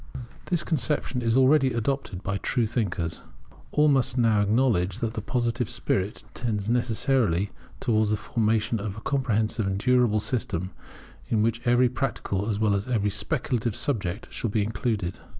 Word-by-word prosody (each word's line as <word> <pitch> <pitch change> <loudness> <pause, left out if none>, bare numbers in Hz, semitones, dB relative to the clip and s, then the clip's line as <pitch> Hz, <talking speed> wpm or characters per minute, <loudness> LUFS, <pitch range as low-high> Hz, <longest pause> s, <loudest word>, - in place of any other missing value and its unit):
This 175 -2 0
conception 145 -4 -1
is 115 +1 +2
already 135 0 +4
adopted 115 -5 -2
by 100 - -2
all 100 - 0
true 120 -3 0
thinkers. 100 -8 -2 0.5
All 150 +1 +3
must 135 -3 +2
now 110 -4 +4
acknowledge 105 -4 +2
that 115 -2 -2
the 110 - -3
Positive 120 0 -1
spirit 100 +2 -2
tends 110 -4 -2
necessarily 115 - +1 0.3
towards 110 -2 +2
the 105 - +1
formation 110 0 0
of 100 0 -5
a - - -7
comprehensive 110 -6 0
and 95 0 -1
durable 120 -1 +3
system, 95 -6 -2 0.6
in 110 -2 +2
which 115 +1 0
every 120 +1 +4
practical 115 -5 -2
as 105 -2 -1
well 110 -2 +3
as 100 +3 -1 0.3
speculative 115 -3 -1
subject 100 -9 -2
shall 115 - -2
be 105 0 +1
included. 105 -3 -2
115 Hz, 155 wpm, -26 LUFS, 105-125 Hz, 0.6 s, already